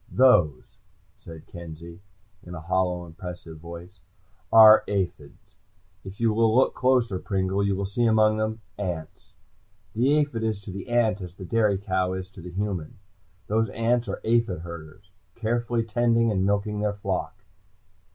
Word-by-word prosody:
"Those," 90 - +3 0.4
said 80 -2 -12
Kenzie 85 +1 -10 0.4
in 90 0 -10
a - - -6
hollow, 90 +1 -1
impressive 85 -1 -9
voice, 85 +3 -11 0.5
"are 110 -1 +9
aphis. 90 -7 -4 0.5
If 95 +1 -10
you 115 -2 +2
will 110 0 +3
look 130 - +4
closer, 125 -7 +1
Pringle, 95 0 -1
you 100 -1 +1
will 100 +1 -2
see 110 +5 -1
among 110 -1 +4
them 110 +1 -2 0.2
ants. 85 -6 -6 0.6
The 130 +6 +2
aphid 145 -6 0
is 110 -2 -1
to 100 - -8
the 100 +4 -8
ant 110 -4 +2
as 90 -1 -8
the 95 - -9
dairy 105 0 +2
cow 95 -1 -1
is 95 0 -6
to 95 - -12
the 90 - -8
human. 95 -3 -4 0.5
Those 110 +2 0
ants 120 +2 0
are - - -4
aphid 115 -7 +1
herders, 85 +3 -11 0.2
carefully 120 +1 -1
tending 115 0 +2
and 95 -1 +1
milking 100 +1 0
their 105 -1 -1
flock." 100 +1 -4
100 Hz, 155 wpm, -25 LUFS, 90-110 Hz, 0.6 s, are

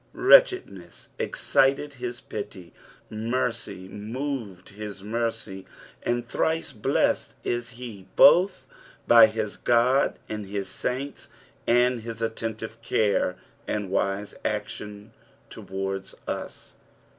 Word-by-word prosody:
Wretchedness 375 - +4
excited 140 +2 +2
his 120 0 -4
pity, 100 -4 -7 0.4
misery 115 -3 -2
moved 110 -2 -5
his 100 -1 -8
mercy, 110 -3 -3 0.3
ind 120 0 -1
thrice 160 +3 -1
blessed 105 - +1
is 120 -1 -2
he 110 -7 -9
both 185 +2 +6 0.4
bj 115 -2 +9
his 110 -1 -3
God 125 +3 +3
and 105 -2 -5
liis 100 0 -3
saints 130 +8 -4 0.4
for - - +4
his 120 -2 +1
attentive 115 0 -4
care 105 -5 +1 0.3
lad 105 -2 -2
vise 100 +1 -1
action 105 0 -4 0.4
towards 95 0 -5
us. - - -6
110 Hz, 100 wpm, -26 LUFS, 100-120 Hz, 0.4 s, bj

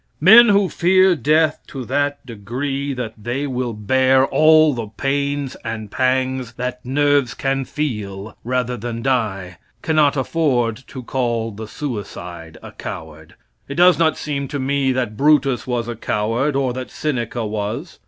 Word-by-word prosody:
Men 225 +8 +8
who 200 -1 +4
fear 185 +1 +3
death 155 +3 +2
to 130 -3 -7
that 145 +3 -1
degree 130 +5 -4
that 120 -3 -4
they 125 +5 -2
will 125 -3 -3
bear 130 +5 +3
all 155 +1 +5
the 115 -3 -4
pains 140 +4 -2
and 110 -3 -5
pangs 130 -1 0
that 125 +1 -5
nerves 145 0 +1
can 135 0 -1
feel 105 -8 -4
rather 125 0 -1
than 115 0 -5
die, 105 -9 -1 0.2
cannot 150 -3 +2
afford 130 -6 0
to 130 - -8
call 120 -3 -1
the 110 +1 -8
suicide 90 - -7
a - - -9
coward. 80 -1 -9 0.3
It 140 - -6
does 180 +1 +5
not 160 -2 +2
seem 140 -2 -3
to 145 - -4
me 135 0 0
that 125 -4 -2
Brutus 140 -4 +2
was 120 -2 -2
a 120 - -4
coward 115 +6 -1
or 135 -2 0
that 130 0 -6
Seneca 120 -5 -3
was. 105 -1 -4
130 Hz, 155 wpm, -20 LUFS, 115-145 Hz, 0.3 s, Men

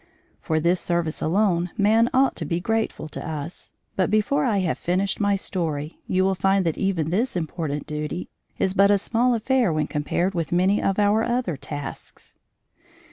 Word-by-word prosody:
For 160 0 0
this 170 +3 +1
service 170 -2 -1
alone 180 0 +1
man 220 +3 +4
ought 265 +1 +3
to - - -3
be 165 +3 -1
grateful 225 -4 -1
to - - -7
us, 155 +2 -6 0.2
but 185 -1 +1
before 215 +8 +2
I 220 -5 +2
have 175 -4 -1
finished 185 +3 0
my 205 -1 +2
story, 160 -6 -3
you 185 0 +2
will 190 0 +2
find 195 +1 +2
that 165 - 0
even 175 -5 -1
this 225 +6 0
important 160 -3 -3
duty 150 +3 -4 0.3
is 190 - 0
but 195 +1 +5
a 205 - +5
small 240 +5 +1
affair 240 -2 +2
when 155 -1 0
compared 170 +5 -1
with 165 -3 -2
many 185 +4 +3
of 195 - 0
our 210 +1 +3
other 240 -7 -1
tasks. 145 0 -8
185 Hz, 180 wpm, -24 LUFS, 160-210 Hz, 0.3 s, but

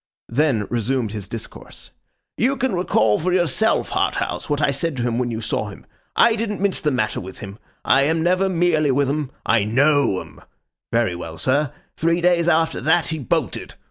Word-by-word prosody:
Then, 125 -4 +1
resumed 120 -1 -1
his 105 -3 -6
discourse. - - -9 0.4
'You 270 +4 +1
can 260 -3 0
recall 110 - +2
for 180 +3 -1
yourself, 180 +5 +1
Harthouse, - - -1
what 145 -1 0
I 150 - +2
said 140 +1 -2
to 120 - -1
him 120 0 0
when 125 -1 -1
you 115 -1 -4
saw 105 -1 -2
him. 100 - -12 0.3
I 230 -1 +5
didn't 215 -2 -3
mince 200 -1 0
the 150 - +1
matter 120 -6 -1
with 95 +1 -9
him. 100 +1 -9 0.3
I 135 - +5
am 160 +2 +1
never 185 +2 +2
mealy 165 -4 +2
with 135 +1 +2
'em. 145 -1 -2 0.2
I 115 -3 +3
KNOW 140 -1 +2
'em. - - -14 0.5
Very 115 -5 +1
well, 85 -1 -7
sir. 130 - +1 0.3
Three 165 +1 +1
days 175 -1 +2
after 165 -1 +2
that, 160 0 +2
he 160 -1 -3
bolted. 130 - -2
145 Hz, 190 wpm, -21 LUFS, 115-170 Hz, 0.5 s, I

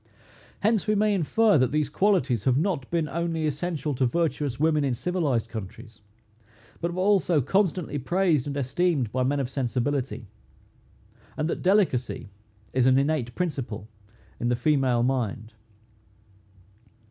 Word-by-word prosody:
Hence 220 -1 +1
we 215 - +2
may 210 0 +2
infer, 200 +1 +3
that 125 -1 +2
these 150 0 +1
qualities 145 - +1
have 130 -1 +3
not 160 -5 -1
been 165 -2 0
only 165 +1 -2
essential 150 0 -2
to 130 0 +1
virtuous 145 -3 -1
women 155 -1 +2
in 135 -3 0
civilized 145 -8 -1
countries, 110 0 -9 0.8
but 170 +1 -1
were 185 +1 -2
also 190 -5 +3
constantly 175 - 0
praised 165 -1 +1
and 145 0 -3
esteemed 140 - 0
by 130 - -1
men 140 +3 +1
of 135 - -1
sensibility; 130 -1 -2 1.1
and 155 0 0
that - - -3
delicacy 180 - +1 0.4
is 130 -1 +3
an 130 0 +5
innate 140 -4 0
principle 135 - -3 0.5
in 120 - 0
the 120 - +2
female 130 -4 +2
mind. 115 -3 -2
145 Hz, 140 wpm, -26 LUFS, 125-170 Hz, 1.1 s, an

